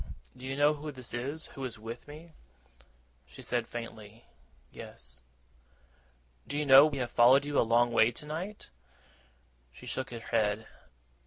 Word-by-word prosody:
'Do 130 Hz, +1 st, -9 dB
you 135 Hz, -, -3 dB
know 145 Hz, +2 st, +4 dB
who 150 Hz, 0 st, -6 dB
this 130 Hz, -4 st, -8 dB
is, 140 Hz, +6 st, -4 dB
who 135 Hz, -, -7 dB
is 125 Hz, -4 st, -5 dB
with 115 Hz, +4 st, -8 dB
me?' 155 Hz, +3 st, -12 dB, 0.9 s
She 65 Hz, -, -12 dB
said 120 Hz, -2 st, -1 dB
faintly, 115 Hz, -2 st, -9 dB, 0.5 s
'Yes.' -, -, -11 dB, 1.3 s
'Do 145 Hz, -, -3 dB
you 150 Hz, -, 0 dB
know 135 Hz, +1 st, +9 dB
that 155 Hz, -, 0 dB
we -, -, -2 dB
have 125 Hz, -3 st, -3 dB
followed 130 Hz, +4 st, +6 dB
you 145 Hz, 0 st, 0 dB
a -, -, +6 dB
long 120 Hz, +1 st, +3 dB
way 115 Hz, -1 st, +5 dB
tonight?' 160 Hz, -, -6 dB, 1.0 s
She -, -, -14 dB
shook 130 Hz, 0 st, -3 dB
her 120 Hz, -, -7 dB
head. 110 Hz, -1 st, 0 dB
125 Hz, 160 wpm, -30 LUFS, 115-145 Hz, 1.3 s, know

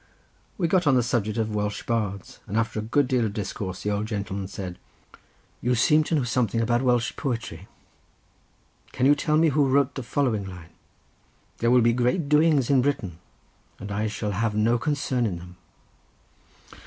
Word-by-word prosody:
We 175 Hz, -, +1 dB
got 180 Hz, -1 st, +2 dB
on 135 Hz, -, +5 dB
the 125 Hz, -, +3 dB
subject 115 Hz, -2 st, -1 dB
of 110 Hz, -1 st, -1 dB
Welsh 105 Hz, 0 st, -2 dB
bards, 105 Hz, -5 st, -3 dB
and 105 Hz, +2 st, -2 dB
after 115 Hz, -1 st, 0 dB
a -, -, -1 dB
good 125 Hz, +5 st, +1 dB
deal 125 Hz, -2 st, +1 dB
of 105 Hz, -2 st, -2 dB
discourse 95 Hz, -2 st, -5 dB
the 105 Hz, -, -1 dB
old 105 Hz, +1 st, -1 dB
gentleman 100 Hz, -3 st, -4 dB
said: 95 Hz, -2 st, -7 dB, 0.8 s
"You 125 Hz, +1 st, +1 dB
seem 150 Hz, +6 st, +4 dB
to 165 Hz, -, 0 dB
know 145 Hz, -, +1 dB
something 120 Hz, -2 st, 0 dB
about 120 Hz, +1 st, +1 dB
Welsh 125 Hz, -2 st, +1 dB
poetry; 120 Hz, -4 st, -4 dB, 1.3 s
can 130 Hz, -, 0 dB
you 145 Hz, -, +7 dB
tell 150 Hz, +1 st, +1 dB
me 160 Hz, 0 st, +4 dB
who 145 Hz, -1 st, +2 dB
wrote 140 Hz, 0 st, +2 dB
the 135 Hz, -, -5 dB
following 115 Hz, -6 st, -1 dB
line? 90 Hz, -2 st, -11 dB, 0.9 s
"'There 115 Hz, -, +2 dB
will 125 Hz, 0 st, +5 dB
be 115 Hz, 0 st, +3 dB
great 125 Hz, +7 st, 0 dB
doings 150 Hz, -3 st, +3 dB
in 135 Hz, -2 st, +5 dB
Britain, 110 Hz, -, -2 dB, 0.6 s
and 100 Hz, 0 st, -8 dB
I 105 Hz, +2 st, -1 dB
shall 105 Hz, 0 st, -3 dB
have 105 Hz, +2 st, -1 dB
no 115 Hz, +3 st, +2 dB
concern 135 Hz, -5 st, 0 dB
in 90 Hz, -4 st, -3 dB
them. 90 Hz, +1 st, -12 dB
115 Hz, 180 wpm, -25 LUFS, 105-135 Hz, 1.3 s, you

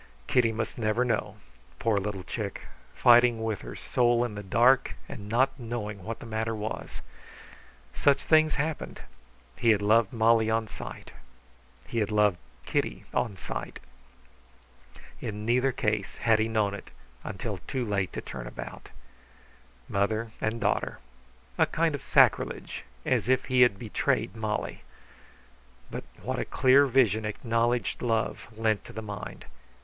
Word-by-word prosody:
Kitty 115 Hz, -, +3 dB
must 110 Hz, +2 st, -4 dB
never 110 Hz, +3 st, +1 dB
know. 120 Hz, -, -1 dB, 0.4 s
Poor 110 Hz, -, +1 dB
little 100 Hz, -2 st, -4 dB
chick, -, -, -4 dB, 0.3 s
fighting 120 Hz, -1 st, +5 dB
with 110 Hz, -3 st, -2 dB
her -, -, -8 dB
soul 120 Hz, -1 st, +2 dB
in 120 Hz, -, -5 dB
the 105 Hz, -, -5 dB
dark 120 Hz, +7 st, +3 dB
and 105 Hz, -1 st, -8 dB
not 130 Hz, +5 st, +2 dB
knowing 105 Hz, -4 st, -5 dB
what 115 Hz, +3 st, -4 dB
the -, -, -11 dB
matter 110 Hz, 0 st, -2 dB
was! 105 Hz, +1 st, -5 dB, 0.9 s
Such 140 Hz, -1 st, +3 dB
things 155 Hz, -1 st, +4 dB
happened. 150 Hz, +1 st, -3 dB, 0.6 s
He 115 Hz, -, +2 dB
had 105 Hz, -2 st, +4 dB
loved 110 Hz, 0 st, +4 dB
Molly 115 Hz, -1 st, +3 dB
on 110 Hz, 0 st, +1 dB
sight. -, -, -9 dB, 0.7 s
He 115 Hz, -, -2 dB
had 105 Hz, -1 st, 0 dB
loved 105 Hz, -4 st, +3 dB, 0.3 s
Kitty -, -, -1 dB
on 115 Hz, -6 st, -1 dB
sight. -, -, -6 dB, 1.4 s
In 105 Hz, 0 st, -5 dB
neither 125 Hz, +3 st, +3 dB
case 105 Hz, -6 st, -1 dB
had 115 Hz, -1 st, +3 dB
he 110 Hz, -, +2 dB
known 110 Hz, -3 st, +1 dB
it 100 Hz, -, -8 dB, 0.3 s
until -, -, -4 dB
too 130 Hz, -2 st, -2 dB
late 100 Hz, -4 st, -1 dB
to -, -, -4 dB
turn -, -, -7 dB
about. -, -, -8 dB, 1.0 s
Mother 110 Hz, +3 st, 0 dB
and 110 Hz, +2 st, -1 dB
daughter; -, -, 0 dB, 0.6 s
a -, -, +5 dB
kind 165 Hz, -1 st, +1 dB
of 145 Hz, -, -4 dB
sacrilege, -, -, +2 dB, 0.2 s
as -, -, +1 dB
if 130 Hz, 0 st, +3 dB
he 130 Hz, -1 st, +3 dB
had 120 Hz, -5 st, +5 dB
betrayed 110 Hz, +1 st, -1 dB
Molly! 110 Hz, -1 st, -3 dB, 1.1 s
But -, -, -5 dB, 0.2 s
what -, -, -2 dB
a -, -, -1 dB
clear 135 Hz, +2 st, +5 dB
vision 115 Hz, -5 st, +3 dB
acknowledged 115 Hz, +2 st, 0 dB
love 115 Hz, -2 st, -1 dB
lent 110 Hz, -2 st, +1 dB
to -, -, -11 dB
the 110 Hz, -, -6 dB
mind! 100 Hz, -1 st, -7 dB
115 Hz, 145 wpm, -28 LUFS, 105-120 Hz, 1.4 s, fighting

